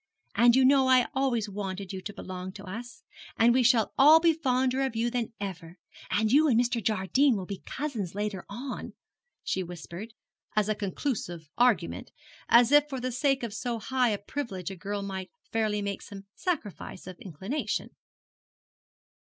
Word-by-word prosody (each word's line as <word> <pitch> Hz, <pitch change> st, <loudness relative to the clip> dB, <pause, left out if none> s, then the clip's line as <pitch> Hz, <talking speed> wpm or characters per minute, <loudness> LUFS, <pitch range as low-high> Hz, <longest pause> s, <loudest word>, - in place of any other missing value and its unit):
And 240 Hz, 0 st, +5 dB
you 265 Hz, 0 st, +5 dB
know 270 Hz, 0 st, +5 dB
I 255 Hz, -2 st, +6 dB
always 255 Hz, -5 st, 0 dB
wanted 195 Hz, -1 st, -5 dB
you 190 Hz, -, -5 dB
to 205 Hz, -, -6 dB
belong 185 Hz, -2 st, -7 dB
to 200 Hz, -, -10 dB
us. 235 Hz, -, -8 dB, 0.3 s
And 235 Hz, +1 st, +5 dB
we 255 Hz, -, +4 dB
shall 235 Hz, -3 st, +3 dB
all 305 Hz, +4 st, +9 dB
be 330 Hz, 0 st, +4 dB
fonder 260 Hz, -3 st, +1 dB
of 265 Hz, -4 st, -1 dB
you 235 Hz, +2 st, 0 dB
than 240 Hz, -2 st, -2 dB
ever. 180 Hz, -3 st, -6 dB, 0.3 s
And 215 Hz, +1 st, +1 dB
you 300 Hz, +4 st, +6 dB
and 235 Hz, -5 st, +4 dB
Mr. 240 Hz, -2 st, 0 dB
Jardine 220 Hz, +7 st, +2 dB
will 190 Hz, -3 st, -4 dB
be 195 Hz, 0 st, -6 dB
cousins, 235 Hz, -, -4 dB
later 205 Hz, -3 st, -3 dB
on,' 250 Hz, +6 st, -6 dB, 0.5 s
she 190 Hz, -, -1 dB
whispered, 180 Hz, +5 st, -8 dB, 0.4 s
as 210 Hz, -1 st, +2 dB
a 215 Hz, -, +2 dB
conclusive 190 Hz, -, -4 dB
argument, 245 Hz, +1 st, +1 dB, 0.4 s
as 240 Hz, +2 st, +6 dB
if 295 Hz, 0 st, +5 dB
for 265 Hz, -2 st, -4 dB
the 255 Hz, +1 st, -2 dB
sake 270 Hz, +1 st, +1 dB
of 230 Hz, -3 st, -4 dB
so 235 Hz, +1 st, -2 dB
high 250 Hz, +3 st, +1 dB
a 210 Hz, -, 0 dB
privilege 200 Hz, -, -5 dB
a -, -, -6 dB
girl 200 Hz, +2 st, -4 dB
might 190 Hz, -1 st, -5 dB, 0.2 s
fairly 215 Hz, -2 st, 0 dB
make 200 Hz, -1 st, -3 dB
some 195 Hz, -1 st, -10 dB
sacrifice 275 Hz, -, -4 dB
of 185 Hz, -1 st, -9 dB
inclination. 205 Hz, -, -3 dB
225 Hz, 175 wpm, -28 LUFS, 195-255 Hz, 0.5 s, all